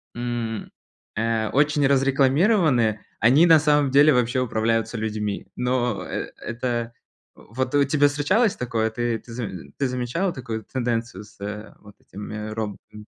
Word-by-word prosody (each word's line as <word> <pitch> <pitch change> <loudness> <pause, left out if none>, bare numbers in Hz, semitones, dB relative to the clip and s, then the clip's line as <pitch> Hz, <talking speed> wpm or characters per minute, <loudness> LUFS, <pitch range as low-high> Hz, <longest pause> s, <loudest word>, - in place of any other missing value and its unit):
м, 120 -2 -4 0.5
э, 110 0 0
очень 145 0 +2
разрекламированы, 135 - +3 0.2
они 140 +10 +5
на 160 -1 +8
самом 150 -2 +3
деле 145 +3 +6
вообще 125 +1 +1
управляются 115 -1 0
людьми. 105 -2 -3
Но 125 -5 -1
э - - -5
это 120 0 -3 0.4
Вот 130 +5 -5
у 145 - +5
тебя 145 +1 +3
встречалось 185 +10 +1
такое? 115 -3 -1
Ты 120 0 -1
ты 115 +1 -13
заме 95 - -6
ты 135 - 0
замечала 125 +9 -1
такую 115 -4 -5
тенденцию 120 -5 -3
с 105 - -19
э 105 +2 -7
вот 105 0 -16
этими 105 +2 -7
роботами? 105 -1 -7
120 Hz, 140 wpm, -23 LUFS, 110-135 Hz, 0.5 s, на